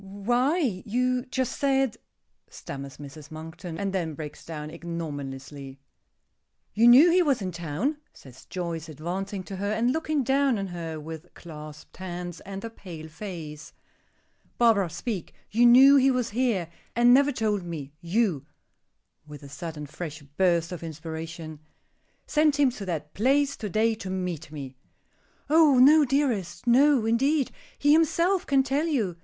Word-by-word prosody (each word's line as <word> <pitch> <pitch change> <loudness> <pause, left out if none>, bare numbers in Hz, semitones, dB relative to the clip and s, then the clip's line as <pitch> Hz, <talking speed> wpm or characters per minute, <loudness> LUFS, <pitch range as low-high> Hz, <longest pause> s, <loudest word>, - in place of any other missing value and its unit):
"Why 240 - 0
you 250 +3 0
just 260 -1 -2
said 270 -4 +1 0.3
" - - -51 0.2
stammers 140 -1 -8
Mrs. 145 +1 -11
Monkton, 165 +2 -8
and 195 +1 -2
then 165 -5 -2
breaks 150 -1 -8
down 155 -2 -7
ignominiously. 145 -5 -7 0.9
"You 230 +3 +5
knew 275 +9 +8
he 365 +2 +5
was 285 -7 +2
in 190 -3 -3
town," 175 - -2
says 130 -2 -15
Joyce, 170 -3 -5
advancing 185 +6 -4
to 195 +1 -7
her, 200 +2 -2
and 230 +3 +1
looking 310 -2 0
down 270 -1 +2
on 195 - -2
her 165 -3 -6
with 160 +2 -9
clasped 150 -2 -11
hands 175 -2 -6
and 195 +2 -7
a - - -4
pale 170 -8 -10
face. 160 -4 -8 0.8
"Barbara, 220 -6 +4
speak. 200 +2 -5 0.2
You 235 +3 +5
knew 270 +4 +8
he 270 0 +5
was 250 -3 0
here, 220 -8 0 0.3
and 240 +1 +6
never 280 +2 +5
told 215 -5 0
me; 155 -5 -7
you," 170 - 0 0.8
with 150 -1 -11
a 140 - -10
sudden, 155 0 -6
fresh 155 0 -7
burst 170 +3 +1
of 180 - -6
inspiration, 160 0 -7 0.7
"sent 300 -1 +2
him 275 -3 +4
to 205 -5 -8
that 150 -4 -4
place 275 +5 +2
to 210 - -5
day 220 +4 +2
to 200 -3 -7
meet 180 -5 -4
me." 135 -4 -7 0.7
"Oh, 305 -2 +5
no, 295 +4 +7
dearest. 255 - -1
No, 260 0 +4
indeed. 270 +5 +2 0.3
He 290 +1 +4
himself 340 +4 +2
can 275 -1 +3
tell 275 +5 0
you. 215 - -1
195 Hz, 155 wpm, -26 LUFS, 160-255 Hz, 0.9 s, knew